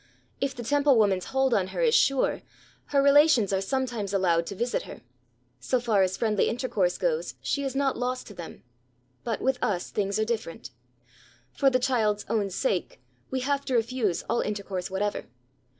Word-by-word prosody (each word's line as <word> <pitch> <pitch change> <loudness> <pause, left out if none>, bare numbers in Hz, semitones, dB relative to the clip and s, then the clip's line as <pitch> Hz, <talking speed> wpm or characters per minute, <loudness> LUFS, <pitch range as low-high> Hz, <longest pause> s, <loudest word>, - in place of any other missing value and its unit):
If 275 -1 -2
the 240 - -6
Temple 285 +1 +3
woman's 195 -4 +2
hold 265 -1 +1
on 190 -4 +2
her - - -4
is 475 -2 +3
sure, 275 - +2 0.4
her 280 -1 +2
relations 280 -7 +5
are 190 - +1
sometimes 230 -3 -2
allowed 170 -3 +2
to 200 - -5
visit 240 +5 -1
her; - - -10 0.6
so 245 - 0
far 225 -5 +2
as 190 0 +1
friendly 215 -3 +1
intercourse 215 -7 0
goes 485 -1 -1
she 280 - -2
is 270 -1 -3
not 275 -1 +1
lost 255 +1 -2
to 205 - -11
them. 170 -4 -10 0.6
But 230 -3 -3
with 265 -1 +1
us 180 -4 -1
things 200 -1 -1
are 220 - +1
different. 215 - -4 0.8
For 275 - +3
the 255 - +2
child's 230 -5 0
own 210 -3 0
sake 190 -1 -2 0.3
we 260 0 -2
have 280 +1 0
to 260 - -1
refuse 230 -5 0
all 235 - 0
intercourse 200 -3 -4
whatever. 205 +2 -2
230 Hz, 180 wpm, -27 LUFS, 195-265 Hz, 0.8 s, relations